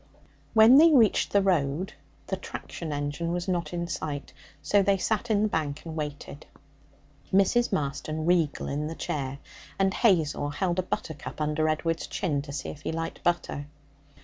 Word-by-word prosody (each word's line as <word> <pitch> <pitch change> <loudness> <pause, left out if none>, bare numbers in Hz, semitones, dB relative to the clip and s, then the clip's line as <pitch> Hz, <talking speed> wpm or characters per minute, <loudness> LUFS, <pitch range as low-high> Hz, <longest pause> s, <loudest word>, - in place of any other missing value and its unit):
When 225 +5 +8
they 330 +1 +7
reached 235 -8 +4
the 200 -1 +3
road, 175 0 0 0.3
the - - -2
traction 165 -3 -7
engine 145 +3 -2
was 175 +1 -2
not 175 -4 -1
in 170 -1 -2
sight, 150 -4 -5 0.3
so 205 - +4
they 195 0 +3
sat 220 +5 -1
in 210 -1 +3
the - - +3
bank 150 -6 -3
and 160 -1 -6
waited, 150 -1 -6 0.8
Mrs. 200 +5 +3
Marston 155 -2 -2
regal 170 -4 +1
in 150 +2 -2
the 165 - -5
chair; 140 -3 -3 0.4
and 195 0 +2
Hazel 165 -10 +2
held 175 +4 -1
a - - +4
buttercup 160 -5 -5
under 155 +1 +1
Edward's 165 +1 -1
chin 150 -6 -1
to 140 0 -9
see 140 - -4
if 145 - -9
he - - -3
liked 165 0 -4
butter. 170 -4 -1
165 Hz, 170 wpm, -27 LUFS, 150-190 Hz, 0.8 s, When